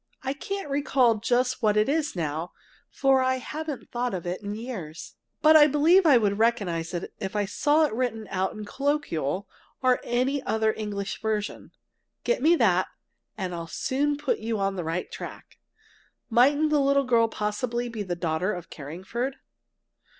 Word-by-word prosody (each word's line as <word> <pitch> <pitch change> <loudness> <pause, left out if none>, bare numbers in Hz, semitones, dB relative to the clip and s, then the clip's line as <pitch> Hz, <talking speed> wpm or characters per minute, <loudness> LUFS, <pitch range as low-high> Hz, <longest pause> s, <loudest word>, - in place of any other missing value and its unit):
I 265 0 -1
can't 395 +6 -5
recall 275 -4 +3
just 250 +3 +1
what 215 -2 +3
it 210 - +3
was 295 -2 0
now, 160 +1 -3 0.4
for 270 -1 +3
I 260 0 +2
haven't 300 +2 -6
thought 245 -3 -1
of 180 - -5
it 180 +3 -3
in 205 0 -4
years. 210 -10 -7 0.3
But 310 +1 +7
I 300 -1 +9
believe 325 +5 +4
I'd 250 -7 +6 0.2
recognize 185 -8 0
it 175 - -5
if 190 +1 -5
I 205 -1 +1
saw 295 +10 +3
it 295 - -3
written 225 -3 -2
out 190 0 -1
in 215 -2 -7
Colloquial 205 - -1 0.4
or 255 -1 +3
any 255 +4 0
other 220 -3 +1
English 200 -2 -4
version! 215 -1 -3 0.5
Get 485 - 0
me 330 +4 +5
that, 185 - +3 0.5
and 185 -3 -3
I'll 170 -1 -5
soon 285 - -1
put 295 - -1
you 225 0 -2
on 195 -1 0
the 180 - -3
right 165 +3 -3
track! - - -9 0.7
Mightn't 285 +6 +4
the 295 -2 +4
little 275 0 +3
girl 235 -2 +4
possibly 225 +3 -2
be 230 -3 -5
the 180 -3 -3
daughter 170 +3 -1
of 175 -2 -8
Carringford? 190 - -5
230 Hz, 170 wpm, -26 LUFS, 195-275 Hz, 0.7 s, I